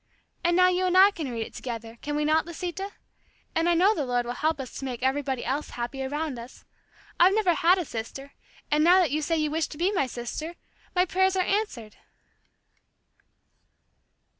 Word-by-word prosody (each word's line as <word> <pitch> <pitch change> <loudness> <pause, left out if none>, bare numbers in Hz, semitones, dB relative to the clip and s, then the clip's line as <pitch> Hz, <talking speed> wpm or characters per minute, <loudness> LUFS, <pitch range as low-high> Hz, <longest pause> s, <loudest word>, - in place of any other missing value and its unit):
And 345 0 +3
now 365 0 +6
you 365 0 +1
and 365 0 +2
I 390 +2 +8
can 320 -9 -5
read 230 -2 -3
it - - -13
together; 230 -2 -7
can 295 0 -3
we 300 0 0
not, 315 +2 +2
Lisita? 360 +3 -5 0.6
And 330 +1 +2
I 345 - +3
know 380 +5 +5
the 305 - -2
Lord 245 -2 0
will 240 - -3
help 310 +4 0
us 260 -2 -6
to 270 - -5
make 250 -2 -5
everybody 265 -1 -1
else 275 +4 -2
happy 245 +3 -4
around 290 -1 -3
us. 235 +2 -12 0.5
I've 370 +3 +6
never 400 -5 +3
had 340 +4 +4
a 360 - -2
sister, 270 +4 -7 0.4
and 300 +1 +3
now 355 +3 +7
that 360 -5 +3
you 305 +2 0
say 325 +2 0
you 305 -1 0
wish 320 +1 0
to 295 - -10
be 355 +5 +1
my 360 -10 +1
sister, 255 +8 -6 0.4
my 360 0 +4
prayers 380 +1 +2
are 370 -1 +1
answered!" 260 - -2
310 Hz, 200 wpm, -26 LUFS, 260-360 Hz, 0.6 s, I